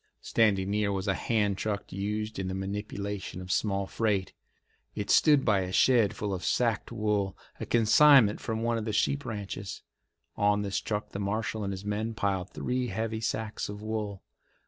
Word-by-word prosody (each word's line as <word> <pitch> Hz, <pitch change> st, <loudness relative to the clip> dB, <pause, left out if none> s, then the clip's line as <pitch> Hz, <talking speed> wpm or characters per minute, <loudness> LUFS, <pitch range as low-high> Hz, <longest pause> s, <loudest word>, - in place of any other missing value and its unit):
Standing 100 Hz, -4 st, +2 dB
near 105 Hz, -1 st, +1 dB
was 95 Hz, 0 st, -2 dB
a 95 Hz, -, +3 dB
hand 105 Hz, -2 st, 0 dB
truck 105 Hz, -2 st, -3 dB
used 105 Hz, +2 st, -3 dB
in 95 Hz, -, -2 dB
the 95 Hz, -, -3 dB
manipulation 100 Hz, -1 st, -4 dB
of 90 Hz, 0 st, -6 dB
small 100 Hz, 0 st, +1 dB
freight. 100 Hz, -2 st, -1 dB, 0.6 s
It 105 Hz, -, -2 dB
stood 145 Hz, -4 st, +5 dB
by 100 Hz, -2 st, +4 dB
a 95 Hz, -1 st, -3 dB
shed 115 Hz, +1 st, +4 dB
full 105 Hz, -2 st, -3 dB
of 90 Hz, -, -4 dB
sacked 115 Hz, -4 st, 0 dB
wool, 105 Hz, -3 st, -1 dB, 0.2 s
a -, -, -5 dB
consignment 115 Hz, 0 st, +6 dB
from 110 Hz, -1 st, -3 dB
one 115 Hz, 0 st, +1 dB
of 110 Hz, -, -5 dB
the 110 Hz, -, -2 dB
sheep 140 Hz, +6 st, +1 dB
ranches. 100 Hz, -2 st, -5 dB, 0.5 s
On 105 Hz, 0 st, +2 dB
this 100 Hz, -1 st, -2 dB
truck 105 Hz, -1 st, -3 dB
the 100 Hz, -, -5 dB
marshal 110 Hz, +2 st, -2 dB
and 100 Hz, -, -2 dB
his 95 Hz, +1 st, -6 dB
men 110 Hz, +2 st, -2 dB
piled 95 Hz, -4 st, -1 dB
three 125 Hz, 0 st, -2 dB
heavy 110 Hz, +1 st, -3 dB
sacks 110 Hz, -2 st, -3 dB
of 105 Hz, +1 st, -7 dB
wool. 105 Hz, -3 st, -4 dB
105 Hz, 180 wpm, -29 LUFS, 100-110 Hz, 0.6 s, consignment